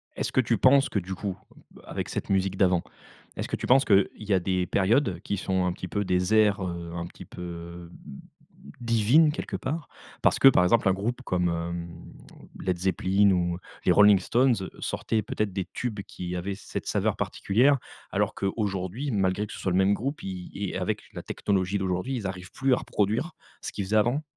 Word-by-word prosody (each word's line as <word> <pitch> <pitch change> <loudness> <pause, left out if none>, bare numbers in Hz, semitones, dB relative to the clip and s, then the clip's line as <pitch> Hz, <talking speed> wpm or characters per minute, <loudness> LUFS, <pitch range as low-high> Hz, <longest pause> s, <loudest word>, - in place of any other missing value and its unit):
Est-ce - - -2
que 130 - +3
tu 115 -1 +1
penses 135 +1 +5
que 100 - 0
du 95 +1 -6
coup 95 -1 -4 0.3
bah, - - -17
avec - - -4
cette - - -4
musique 95 -1 +1
d'avant, 90 -3 +3 0.5
est-ce - - -3
que - - -2
tu - - -5
penses 135 +2 +5
qu'il 100 -2 +5
y 105 -2 -2
a 95 - +4
des 90 0 0
périodes 100 - +2
qui 100 - -3
sont 95 -1 0
un 90 - +1
petit 90 - -7
peu 105 +3 -1
des 90 +2 0
ères, 105 -2 +4
heu, 85 -1 -5
un 85 0 -3
petit - - -12
peu, 90 - -11
heu, 85 0 -8 0.2
mmh, 70 - -9 0.6
divines 120 +7 +4
quelque - - -5
part? 150 +4 -4 0.3
Parce - - +3
que 135 - +8
par 90 -9 +6
exemple 95 +1 +3
un - - +4
groupe 115 +7 -3
comme, 90 -4 0
hem, 85 +1 -3 0.7
Led 90 -1 -1
Zeppelin 95 +2 +2
ou 85 -1 0 0.3
les - - +5
Rolling 105 -2 +7
Stones, 125 +5 +3 0.2
sortaient 110 -1 -1
peut-être 105 -1 -2
des 95 -2 -2
tubes 110 -5 -3
qui 90 -2 -6
avaient 95 +2 -3
cette 105 - -7
saveur - - +1
particulière, 130 +8 +2 0.3
alors - - 0
qu'aujourd'hui 100 +5 -2
malgré 100 0 +1
que - - -9
ce - - -8
soit 95 - -1
le 90 - +2
même 95 +1 +4
groupe, 135 +8 -3
i 90 -2 -6
i 100 -2 -4
avec - - -2
la - - -6
technologie 100 0 -1
d'aujourd'hui 95 +7 -2
ils 105 -5 -3
arrivent 95 0 -7
plus 135 -1 +1
à - - +3
reproduire, 110 - -1 0.3
ce - - -5
qu'ils 100 - -4
faisaient 105 +3 -1
avant? 120 +8 +2
100 Hz, 205 wpm, -27 LUFS, 90-110 Hz, 0.7 s, que